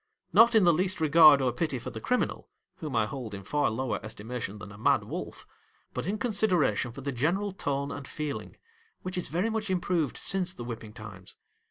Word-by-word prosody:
Not 230 +1 +7
in 220 - +6
the 175 -1 +6
least 185 +3 0
regard 155 -3 +7
or 125 - +2
pity 140 +2 -2
for 120 - -6
the - - -7
criminal, 250 0 -1 0.3
whom 150 -5 -5
I 110 -1 +3
hold 115 -3 -6
in 100 - -8
far 145 +8 +1
lower 120 +3 -2
estimation 110 0 -6
than 105 0 -10
a 105 - -11
mad - - +3
wolf, - - -7 0.5
but - - -3
in 205 +2 -1
consideration 180 - +1
for 135 - -9
the 140 +1 -3
general 175 +11 0
tone 140 -6 -2
and 140 -1 -7
feeling, 150 -2 -5 0.5
which 185 0 -4
is 180 - 0
very 185 +8 0
much 215 -2 -2
improved 175 -5 0
since 185 -2 0
the 120 - -8
whipping 115 -3 -7
times. 100 -5 -10
145 Hz, 200 wpm, -28 LUFS, 120-185 Hz, 0.5 s, Not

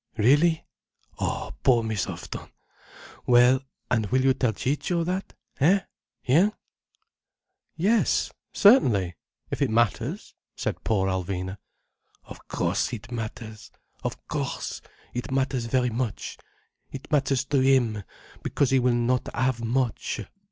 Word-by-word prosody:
Really? 145 +9 +4 0.5
Oh - - -2
poor 120 -3 +4
Miss 110 -3 -1
Houghton! - - -7 0.8
Well—and 125 -2 +3
will 130 +4 +2
you 135 0 +5
tell 125 -3 +1
Ciccio 150 - -1
that? 185 +3 -3 0.2
Eh? 180 +8 +5 0.4
Hein?" 175 +11 +4 1.2
"Yes—certainly—if 175 - +2
it 140 - +3
matters," 115 -1 0 0.2
said - - -3
poor 95 -4 +1
Alvina. 95 +1 -3 0.6
"Of - - -13
course - - 0
it 120 +1 -7
matters. 110 -1 -6 0.3
Of - - -5
course - - -3 0.3
it 125 - -4
matters 130 -2 0
very 125 +1 +1
much. 115 -1 -3 0.5
It 135 +2 -9
matters 135 -2 +2
to 140 0 +1
him. 130 -5 +3 0.4
Because 140 -3 0
he 135 - +5
will 125 -1 +2
not 120 +1 +1
have 120 -1 0
much. 120 -1 -1
125 Hz, 115 wpm, -26 LUFS, 110-135 Hz, 1.2 s, you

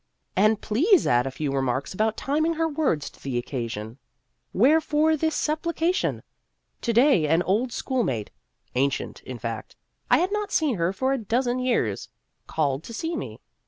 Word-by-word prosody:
And 215 +2 +4
please 330 - +3
add 120 +2 +3
a - - -1
few 135 +2 -3
remarks 135 +1 -1
about 220 +3 0
timing 315 +4 0
her 325 +1 +1
words 285 - 0
to - - -21
the 135 -3 -3
occasion. 115 -2 -4 0.5
Wherefore 305 +5 +3
this 315 0 0
supplication? 335 +3 0 0.6
To 235 - 0
day 235 - +4
an 165 +4 +3
old 225 +7 +1
school 260 +1 -1
mate 115 - -2 0.4
ancient, 135 +2 -1
in 130 - -7
fact; 115 -1 -6 0.3
I - - +6
had 365 +3 +1
not 420 -1 -2
seen 300 - +1
her 170 +1 +1
for 260 +7 0
a 270 - -1
dozen 240 +3 0
years 235 - 0 0.4
called 145 -2 -1
to 230 - -7
see 330 +6 -3
me. - - -6
225 Hz, 165 wpm, -25 LUFS, -, 0.6 s, I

